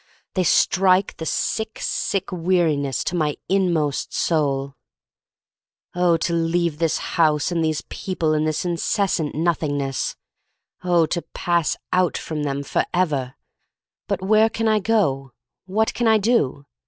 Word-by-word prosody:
They 185 Hz, -, +1 dB
strike 190 Hz, +2 st, +3 dB
the 160 Hz, -, -5 dB
sick, 220 Hz, 0 st, -2 dB
sick 195 Hz, -1 st, -2 dB
weariness 165 Hz, -7 st, +1 dB
to 180 Hz, -, -2 dB
my 150 Hz, -3 st, 0 dB
inmost 170 Hz, -7 st, 0 dB
soul. 140 Hz, -4 st, 0 dB, 1.2 s
Oh, 175 Hz, -2 st, +3 dB
to 170 Hz, +1 st, -1 dB
leave 165 Hz, -1 st, 0 dB
this 165 Hz, -2 st, +1 dB, 0.2 s
house 150 Hz, +1 st, +2 dB
and 170 Hz, -2 st, 0 dB
these 155 Hz, -1 st, 0 dB
people, 165 Hz, -5 st, -2 dB
and 155 Hz, 0 st, +1 dB
this 155 Hz, +3 st, -1 dB
intense 175 Hz, +3 st, 0 dB
Nothingness 150 Hz, -3 st, -1 dB, 0.3 s
— -, -, -41 dB
oh, 175 Hz, -2 st, +3 dB
to 170 Hz, +2 st, -2 dB
pass 170 Hz, -3 st, 0 dB, 0.2 s
out 185 Hz, -1 st, +2 dB
from 155 Hz, -2 st, -4 dB
them, 140 Hz, -1 st, -2 dB
forever! 140 Hz, -4 st, -1 dB, 0.7 s
But 195 Hz, -2 st, -2 dB
where 215 Hz, +3 st, +4 dB
can 225 Hz, 0 st, -2 dB
I 215 Hz, -1 st, +3 dB
go, 155 Hz, -, 0 dB, 0.3 s
what 220 Hz, +4 st, +1 dB
can 240 Hz, -, 0 dB
I 220 Hz, 0 st, +5 dB
do? 200 Hz, -, +1 dB
170 Hz, 140 wpm, -22 LUFS, 150-185 Hz, 1.2 s, I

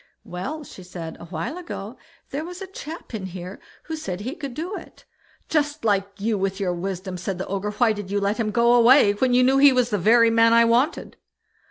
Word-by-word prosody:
"Well", 195 Hz, -, -6 dB
she 195 Hz, -, -12 dB
said, 175 Hz, -3 st, -8 dB
"a -, -, -9 dB
while 170 Hz, -, -5 dB
ago, 235 Hz, -, -7 dB, 0.4 s
there 285 Hz, +3 st, -3 dB
was 355 Hz, +2 st, -8 dB
a 385 Hz, -, -6 dB
chap 330 Hz, -7 st, -9 dB
in 200 Hz, -4 st, -4 dB
here 185 Hz, +1 st, -8 dB, 0.2 s
who 320 Hz, -, -5 dB
said 195 Hz, -, -5 dB
he 250 Hz, +6 st, -4 dB
could 280 Hz, -6 st, -7 dB
do 350 Hz, +7 st, -4 dB
it." -, -, -12 dB, 0.4 s
"Just 295 Hz, -5 st, -1 dB
like 200 Hz, -1 st, 0 dB
you, 215 Hz, 0 st, 0 dB
with 195 Hz, +1 st, -2 dB
your 185 Hz, -3 st, 0 dB
wisdom!" 185 Hz, +1 st, -4 dB
said 185 Hz, +1 st, -3 dB
the 190 Hz, -, -4 dB
Ogre; 195 Hz, +1 st, -3 dB
"why 220 Hz, +2 st, +2 dB
did 205 Hz, -2 st, -7 dB
you 205 Hz, +1 st, 0 dB
let 200 Hz, +1 st, 0 dB
him 220 Hz, -2 st, 0 dB
go 235 Hz, +2 st, +3 dB
away 245 Hz, -2 st, +6 dB
then, 205 Hz, -, -7 dB
when 255 Hz, -1 st, +2 dB
you 250 Hz, -, +5 dB
knew 265 Hz, +2 st, +4 dB
he 280 Hz, 0 st, +8 dB
was 250 Hz, -2 st, +1 dB
the 205 Hz, -, +1 dB
very 230 Hz, +4 st, +5 dB
man 230 Hz, 0 st, +5 dB
I 230 Hz, 0 st, +6 dB
wanted?" 245 Hz, +7 st, +1 dB
225 Hz, 230 wpm, -23 LUFS, 195-265 Hz, 0.4 s, he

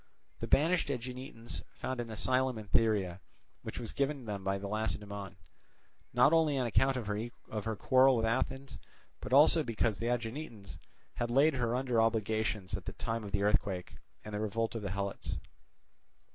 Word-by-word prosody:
The -, -, -4 dB
banished 165 Hz, +2 st, +3 dB
Aeginetans 125 Hz, -2 st, -5 dB
found 130 Hz, -1 st, -4 dB
an 120 Hz, -1 st, -3 dB
asylum 130 Hz, +3 st, +1 dB
in 110 Hz, -, -7 dB
Thyrea, 100 Hz, -6 st, +2 dB, 0.4 s
which -, -, -7 dB
was 115 Hz, -2 st, -4 dB
given 140 Hz, 0 st, 0 dB
to -, -, -12 dB
them 100 Hz, -3 st, -4 dB
by 95 Hz, 0 st, 0 dB
Lacedaemon, 100 Hz, -1 st, -3 dB, 0.8 s
not 150 Hz, -, +5 dB
only 160 Hz, -4 st, +4 dB
on 130 Hz, -, +1 dB
account 130 Hz, +3 st, +2 dB
of 120 Hz, -, -3 dB
her 110 Hz, 0 st, -4 dB
quarrel 130 Hz, +3 st, +5 dB
with 115 Hz, -, +1 dB
Athens, 130 Hz, +4 st, -2 dB, 0.4 s
but -, -, -7 dB
also 150 Hz, +4 st, +7 dB
because 115 Hz, -5 st, 0 dB
the 115 Hz, -, -1 dB
Aeginetans 120 Hz, -, -4 dB, 0.3 s
had 120 Hz, -, -2 dB
laid 140 Hz, +6 st, +4 dB
her 120 Hz, -2 st, 0 dB
under 125 Hz, -3 st, +2 dB
obligations 110 Hz, -3 st, 0 dB
at -, -, -8 dB
the -, -, -5 dB
time 115 Hz, 0 st, -3 dB
of 100 Hz, -, -7 dB
the 100 Hz, -, +1 dB
earthquake 100 Hz, -3 st, 0 dB, 0.3 s
and 105 Hz, -, -7 dB
the 105 Hz, -, -2 dB
revolt 110 Hz, +2 st, -1 dB
of 115 Hz, -, -4 dB
the 100 Hz, -, -3 dB
Helots. 100 Hz, +1 st, -3 dB
115 Hz, 170 wpm, -32 LUFS, 105-130 Hz, 0.8 s, also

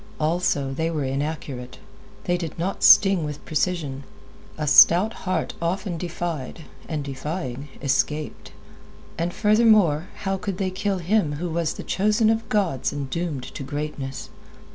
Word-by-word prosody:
Also, 155 Hz, -4 st, 0 dB
they 160 Hz, +4 st, -1 dB
were 155 Hz, -3 st, -2 dB
inaccurate; 135 Hz, -2 st, -4 dB, 0.5 s
they 175 Hz, -, +1 dB
did 170 Hz, -3 st, -5 dB
not 180 Hz, +4 st, -3 dB
sting 195 Hz, -5 st, +7 dB
with 150 Hz, -1 st, -6 dB
precision. 155 Hz, -4 st, -1 dB, 0.5 s
A 155 Hz, -, -2 dB
stout 175 Hz, +8 st, +7 dB, 0.2 s
heart 180 Hz, -4 st, -1 dB
often 175 Hz, 0 st, -2 dB
defied, 170 Hz, -4 st, -4 dB, 0.3 s
and 155 Hz, -3 st, -2 dB
defying, 140 Hz, -1 st, -5 dB
escaped. 135 Hz, -, -1 dB, 0.7 s
And, 170 Hz, +1 st, 0 dB
furthermore, 210 Hz, -7 st, +4 dB, 0.2 s
how 195 Hz, -1 st, 0 dB
could 190 Hz, -1 st, -4 dB
they 185 Hz, -1 st, -1 dB
kill 195 Hz, +1 st, -1 dB
him 180 Hz, -3 st, +1 dB
who 170 Hz, +4 st, -4 dB
was 165 Hz, -1 st, -1 dB
the -, -, -7 dB
chosen 215 Hz, +3 st, +2 dB
of 225 Hz, 0 st, -2 dB
gods 190 Hz, -, 0 dB
and 140 Hz, -2 st, -5 dB
doomed 165 Hz, -5 st, -3 dB
to -, -, -7 dB
greatness? 140 Hz, -1 st, -5 dB
165 Hz, 140 wpm, -24 LUFS, 145-185 Hz, 0.7 s, sting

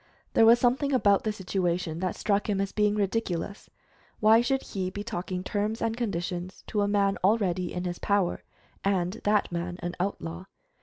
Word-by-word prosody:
There 225 Hz, -, +6 dB
was 235 Hz, +1 st, +8 dB
something 260 Hz, +4 st, +1 dB
about 205 Hz, -6 st, +3 dB
the 215 Hz, -, +1 dB
situation 180 Hz, -4 st, -2 dB
that 185 Hz, 0 st, -1 dB
struck 205 Hz, 0 st, 0 dB
him 200 Hz, -2 st, +1 dB
as 195 Hz, 0 st, -1 dB
being 210 Hz, -1 st, +2 dB
ridiculous. 200 Hz, -2 st, -2 dB, 0.5 s
Why 220 Hz, +2 st, +6 dB
should 270 Hz, +2 st, 0 dB
he 185 Hz, -2 st, -3 dB
be 205 Hz, +2 st, -6 dB
talking 185 Hz, -3 st, -4 dB
terms 210 Hz, +3 st, -1 dB
and 225 Hz, 0 st, -1 dB
conditions 180 Hz, -5 st, -4 dB
to 210 Hz, -, 0 dB
a 205 Hz, -, +2 dB
man 200 Hz, -1 st, +2 dB
already 185 Hz, -4 st, +2 dB
in 180 Hz, -, -3 dB
his 175 Hz, -1 st, -4 dB
power, 200 Hz, -3 st, +1 dB, 0.4 s
and 190 Hz, 0 st, 0 dB
that 210 Hz, -2 st, +2 dB
man 175 Hz, +1 st, -3 dB
an 175 Hz, 0 st, -2 dB
outlaw? 180 Hz, -2 st, -3 dB
200 Hz, 175 wpm, -28 LUFS, 180-215 Hz, 0.5 s, was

